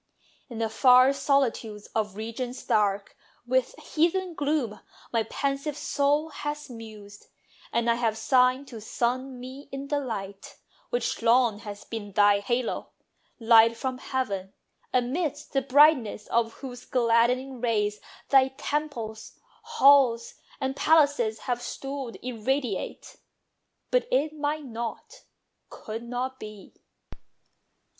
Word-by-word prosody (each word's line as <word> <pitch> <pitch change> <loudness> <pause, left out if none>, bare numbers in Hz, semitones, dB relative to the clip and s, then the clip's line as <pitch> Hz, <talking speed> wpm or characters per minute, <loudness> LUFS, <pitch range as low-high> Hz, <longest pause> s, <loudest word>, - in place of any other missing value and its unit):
In 235 - -7
the 225 0 0
far 255 +3 +6
solitudes 250 -7 0
of 210 -3 -1
regions 240 +4 -5
dark 205 -2 +1 0.3
With 255 +1 0
heathen 345 +3 0
gloom, 285 -8 -1 0.3
my 230 - +3
pensive 275 +5 -2
soul 290 +1 +1
has 295 -1 -5
mused, 215 -3 -11 0.4
And 235 0 0
I 235 - +5
have 230 -2 0
sighed 255 +4 +3
to 230 -3 -9
sun 250 +4 -2
me 260 +3 -10
in 275 +1 -6
the 290 -1 +1
light 200 -7 -6 0.3
Which 485 - -2
long 230 -2 +3
has 205 -1 -8
been 205 -3 -7
thy 205 0 +5
halo; 240 +4 -2 0.5
light 230 0 +6
from 255 +1 -3
heaven, 200 -9 -3 0.4
Amidst 290 +4 -1
the 270 - +2
brightness 270 -5 +4
of 230 -1 +1
whose 250 -2 -9
gladdening 250 +1 +1
rays 210 -3 0 0.3
Thy 265 -1 +6
temples, 240 -8 -4 0.3
halls, 275 - +4 0.3
and 265 -1 -2
palaces 285 -10 +3
have 245 -1 -2
stood 270 -1 -6
Irradiate. 250 -2 -3 0.7
But - - +2
it 315 -12 +1
might 300 0 -2
not, 235 - -7 0.4
could 220 +1 -7
not 250 +2 -4
be. 210 -2 -10
250 Hz, 120 wpm, -27 LUFS, 225-280 Hz, 0.7 s, far